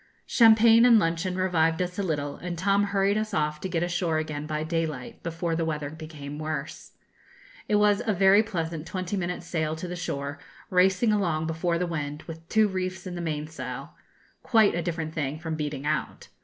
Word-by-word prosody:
Champagne 225 0 +6
and 240 -2 +7
luncheon 170 0 0
revived 165 -3 +2
us 180 +1 -2
a - - +2
little, 145 -6 -2
and 175 -1 -5
Tom 200 +3 +2
hurried 200 +1 +1
us 215 -1 -3
off 150 0 -1
to 190 - -3
get 170 -1 0
ashore 170 -2 0
again 150 -1 -3
by 155 0 -2
daylight, 165 +7 -3
before 165 0 -2
the 165 - 0
weather 150 -3 -3
became 155 -2 -8
worse. 155 0 -5 0.8
It 210 - +3
was 210 0 +4
a - - +3
very 195 +1 +5
pleasant 165 -7 -4
twenty 185 0 -3
minutes' 180 -2 -3
sail 155 -2 -1
to 165 +3 -6
the 180 - -5
shore, 140 -3 -4 0.3
racing 190 +4 +4
along 170 -6 0
before 165 +1 -1
the 180 - 0
wind, 150 -3 -4
with 165 0 -10
two 220 -1 +4
reefs 185 -1 -4
in 185 - -5
the 175 - -4
mainsail 150 -5 -5 0.5
quite 220 -4 +4
a 170 - -1
different 165 -2 -3
thing 145 -1 -2
from 160 0 -5
beating 150 -2 -4
out. 155 +1 -2
170 Hz, 190 wpm, -27 LUFS, 155-190 Hz, 0.8 s, and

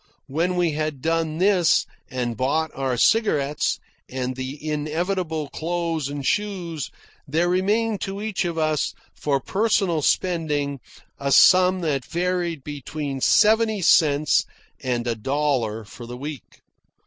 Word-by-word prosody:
When 165 +6 -1
we 175 -2 +2
had 155 -2 -2
done 165 -1 0
this, 185 -2 +3 0.2
and 125 -2 -2
bought 145 +6 0
our 130 -2 -1
cigarettes, 150 - +2 0.3
and 130 0 -3
the 130 +2 -5
inevitable 160 +1 -2
clothes 165 -3 -2
and 145 -1 -5
shoes, 180 -7 -2 0.4
there 160 +5 +1
remained 205 +4 +1
to 195 0 -4
each 215 -2 -2
of 170 -2 -3
us, 155 -2 0 0.2
for 140 -2 0
personal 195 - +1
spending, 150 -5 0 0.4
a 140 0 -1
sum 185 +4 +6
that 145 -6 -1
varied 175 -3 -2
between 145 -1 -5
seventy 220 - +4
cents 150 -3 +4 0.4
and 125 -3 -1
a 120 - 0
dollar 120 -3 -1
for 115 +3 -11
the 120 +1 -7
week. 145 +1 -8
155 Hz, 130 wpm, -23 LUFS, 140-180 Hz, 0.4 s, sum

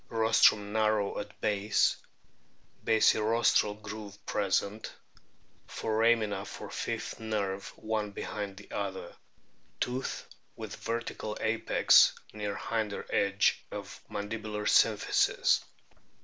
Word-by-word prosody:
Rostrum 110 -2 +4
narrow 110 -2 +1
at 105 0 -8
base; 105 0 +2 0.9
basirostral 110 -1 +3
groove 100 -1 -8
present; 100 +2 -1 0.8
foramina 110 -3 +1
for - - -8
fifth - - -4
nerve 100 -3 -2
one 110 -1 -2
behind 100 -1 -5
the 100 - -13
other. 95 -2 -4 0.6
Tooth 125 +2 -3 0.3
with - - -7
vertical 115 -2 -4
apex, 110 +1 +4 0.2
near 105 -1 -3
hinder 110 -3 -3
edge 100 0 +2
of - - -8
mandibular 105 0 -4
symphysis. - - +3
105 Hz, 90 wpm, -30 LUFS, 100-110 Hz, 0.9 s, Rostrum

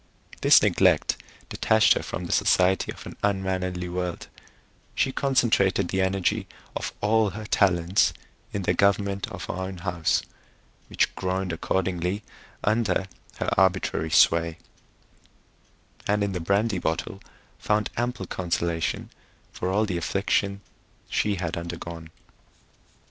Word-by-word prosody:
This - - +7
neglect - - +3 0.3
detached 110 -1 +4
her - - -2
from - - -5
the - - -5
society 95 +1 +3
of - - -11
an - - -8
unmannerly 95 -3 -1
world; 90 0 -4 0.7
she 135 - +1
concentrated 110 -9 +2
the 95 - 0
energy 95 +2 0 0.3
of - - -3
all 110 0 +3
her 105 +3 -7
talents 90 -3 +3 0.4
in 100 - -3
the 90 - +2
government 100 +1 +1
of 100 -6 -7
her - - -4
own 95 +1 -5
house, 85 -3 0 0.6
which - - +1
groaned 95 -1 -2
accordingly 90 +3 -1 0.4
under 110 -2 +1 0.3
her - - -1
arbitrary 95 -4 +1
sway; 85 +1 +4 1.5
and 105 0 +2
in 100 - -1
the 90 - -3
brandy 100 +3 +1
bottle 85 +5 -3 0.4
found 105 0 0
ample 120 -4 -2
consolation 85 -2 -2 0.4
for 90 - -3
all 105 +3 +2
the 95 -4 -2
affliction 100 +2 0 0.5
she 105 -1 +1
had 90 -2 -3
undergone. 85 -1 -6
95 Hz, 125 wpm, -26 LUFS, 90-100 Hz, 1.5 s, This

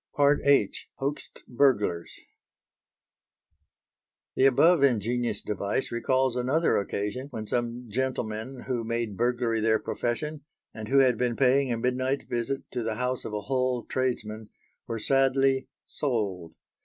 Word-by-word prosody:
H. 140 -6 +3
HOAXED 140 +2 -4
BURGLARS 105 -10 +1 2.1
The 135 - +5
above 160 +5 +5
ingenious 120 -2 +1
device 100 +4 -2
recalls 130 +2 +1
another 130 +7 +2
occasion 105 +6 -3
when 110 -5 -6
some 120 +2 -2
gentlemen 125 0 -3
who 125 -3 -2
made 115 -2 -2
burglary 120 0 0
their 110 0 +3
profession, 135 +7 -3 0.3
and 110 -1 -7
who 135 - +2
had 130 -4 +4
been 125 -1 0
paying 135 +1 +3
a 115 - 0
midnight 130 +3 -1
visit 120 +3 -2
to 125 - -2
the 110 -1 -2
house 125 +1 -2
of 105 - -5
a 105 - -2
Hull 130 +1 -1
tradesman 110 -4 -2 0.4
were 115 - -3
sadly 135 +2 +2 0.2
"sold." 100 - -3
125 Hz, 130 wpm, -27 LUFS, 110-135 Hz, 2.1 s, The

